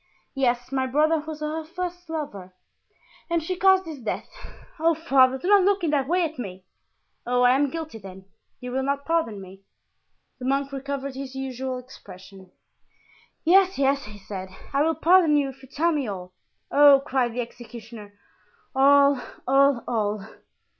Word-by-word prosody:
"Yes, 245 -2 0
my 265 -1 0
brother 310 +4 +2
was 310 -1 -7
her 310 +1 -3
first 355 +1 -6
lover, 205 - -6 0.7
and 335 -1 0
she 370 +3 -3
caused 380 0 +4
his 315 -4 -8
death. 230 - -4 0.5
Oh, 330 +1 +3
father, 265 -5 +3
do 350 - -6
not 405 0 +6
look 395 0 +2
in 320 - +1
that 275 -3 +1
way 355 +3 +2
at 315 -4 -4
me! 190 -5 -7 0.6
Oh, 250 0 +2
I 245 - +6
am 280 +2 +2
guilty, 315 -6 -6
then; 190 -1 -12 0.3
you 250 0 -7
will 265 +1 -1
not 280 +1 -2
pardon 320 -11 0
me?" 190 0 -12 0.8
The 250 - -6
monk 275 +1 0
recovered 275 0 -4
his 265 0 -7
usual 260 -1 -4
expression. 195 -6 -13 0.9
"Yes, 380 +2 +4
yes," 275 0 +1
he 210 0 -11
said, 190 -1 -7 0.2
"I 280 - +2
will 320 +1 +2
pardon 330 -2 +4
you 280 -2 +1
if 265 0 -13
you 265 - -15
tell 335 +3 +1
me 290 -6 -1
all." 185 -3 -7 0.4
"Oh!" 285 -1 +7
cried 250 -4 0
the 245 - -1
executioner, 230 -3 -11 0.6
"all! 280 0 +5 0.3
all! 275 -2 +4
all!" 210 -3 -1
270 Hz, 165 wpm, -24 LUFS, 240-315 Hz, 0.9 s, Oh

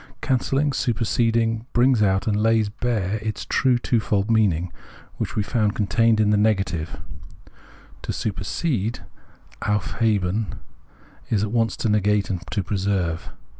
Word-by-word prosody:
Cancelhng, 135 +2 0
superseding, 115 -1 0
brings 120 -1 +4
out 95 -1 +2
and 105 - +1
lays 110 0 +2
bare 110 -2 -1
its 110 0 -4
true 130 -2 +2
twofold 110 -3 0
meaning 90 -6 +2 0.4
which - - -3
we 105 - +1
Perception 100 +4 -2
107 105 - +3
found 100 - -2 0.4
contained - - -3
in 105 -1 +3
the 105 - +3
negative: 90 -7 -2 1.0
to - - -4
supersede 110 - -2 0.6
{auf 105 +1 -1
heben) 105 -3 0 0.7
is 105 -2 +1
at 105 - -2
once 115 -1 +1
to 145 -6 -1
negate 105 -1 +2
and 90 -3 -3
to 100 - -1
preserve. 95 -3 -1
105 Hz, 140 wpm, -23 LUFS, 100-115 Hz, 1.0 s, brings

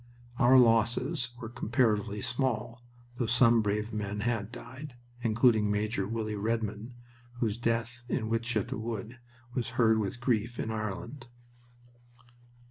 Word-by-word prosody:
Our 130 0 +7
losses 120 +3 +3
were 115 - -6
comparatively 110 -3 0
small, 120 -2 -1 0.3
though 120 - 0
some 120 -1 +5
brave 105 +2 -1
men 105 -1 -3
had 110 -2 -1
died, 130 +3 -9 0.3
including 110 -2 +3
Major 105 -1 0
Willie 110 -1 -3
Redmond, 110 +2 -2 0.4
whose 115 -4 -1
death 115 +1 -2
in 110 -4 -1
Wytschaete 115 -1 -1
Wood 115 +1 -5 0.3
was 125 -2 -2
heard 110 -2 +4
with 105 +3 -3
grief 120 -1 0
in 110 - -2
Ireland. 110 +4 -5
115 Hz, 125 wpm, -30 LUFS, 110-120 Hz, 0.4 s, Our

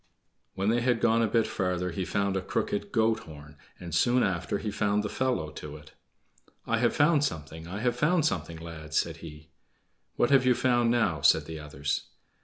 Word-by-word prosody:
When 100 +2 0
they 120 +2 +2
had 120 -1 +1
gone 115 0 +3
a - - +3
little 115 +2 +2
bit - - -2
farther 90 -1 -2
he 95 +2 -3
found 100 0 -1
a 95 - 0
crooked 100 +2 -2
goat 110 0 +2
horn, 75 -6 -12 0.2
and 85 -2 -8
soon 125 +9 +3
after 95 +1 -1
he 105 +1 -4
found 105 0 0
the 105 - -3
fellow 125 -13 -1
to 75 0 -8
it. 75 - -16 0.7
"I 115 - 0
have 120 0 +2
found 150 -1 +4
something! 80 - -4
I 100 +4 -5
have 120 0 +1
found 155 +5 +2
something, 85 - -2
lads!" 80 -2 -6
said 85 -1 0
he. 80 -1 -12 0.6
"What 120 - +2
have 135 -2 +6
you 125 -1 +4
found 120 -2 +2
now?" 110 -11 +1
said - - +4
the 80 -1 -7
others. 75 -1 -3
100 Hz, 205 wpm, -28 LUFS, 80-120 Hz, 0.7 s, have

